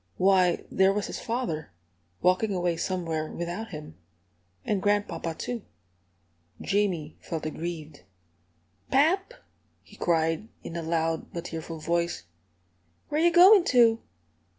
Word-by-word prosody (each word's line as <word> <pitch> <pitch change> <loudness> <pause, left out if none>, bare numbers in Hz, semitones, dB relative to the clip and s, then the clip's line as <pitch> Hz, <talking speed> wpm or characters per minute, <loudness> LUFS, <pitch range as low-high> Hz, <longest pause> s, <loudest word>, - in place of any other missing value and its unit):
Why, 185 -2 +3
there 190 0 +4
was 205 +1 -1
his - - -5
father, 225 - -3 0.5
walking 190 +3 +2
away 175 -1 0
somewhere 165 -3 -2
without 175 +6 -4
him! 150 - -9 0.7
And 200 -2 0
grandpapa, 205 -5 0
too! 240 +5 -4 1.0
Jamie 190 -7 -1
felt 160 -2 -5
aggrieved. 155 -2 -5 0.9
"Pap!" 375 - +2 0.5
he - - -17
cried, 165 +3 0 0.2
in 170 - -7
a 170 - -2
loud 165 0 -1
but 170 0 -5
tearful 165 0 -6
voice, 170 - -1 0.9
"where 300 +2 0
you 345 +1 +5
goin' 365 +3 +8
to?" 230 -3 +4
175 Hz, 120 wpm, -27 LUFS, 165-220 Hz, 1.0 s, goin